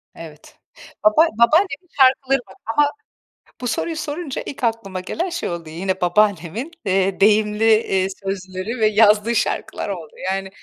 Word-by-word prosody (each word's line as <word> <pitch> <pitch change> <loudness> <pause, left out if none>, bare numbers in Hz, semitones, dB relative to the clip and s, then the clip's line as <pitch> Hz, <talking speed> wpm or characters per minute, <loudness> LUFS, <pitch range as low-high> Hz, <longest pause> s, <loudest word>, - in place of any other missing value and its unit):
Evet, 155 -2 -13 0.5
baba 215 +11 +5
babaannemin 325 +7 +2
şarkıları 265 +1 +4
var 190 - -16
ama 290 +6 +2 0.7
bu 245 - -2
soruyu 325 +7 -2
sorunca 305 -2 -4
ilk 270 - -8
aklıma 225 -5 -2
gelen 335 - -3
şey 340 - -3
oldu, 170 -2 -6
yine 185 +3 -3
babaannemin, 205 - +1
eee, 195 0 +1
deyimli, 210 +1 +3
eee, 190 -4 +1 0.2
sözleri 195 +4 -4
ve 215 - +4
yazdığı 215 +1 +4
şarkılar 205 - -2
oldu. 165 -6 -6 0.2
Yani, 195 0 -3
210 Hz, 140 wpm, -20 LUFS, 190-260 Hz, 0.7 s, baba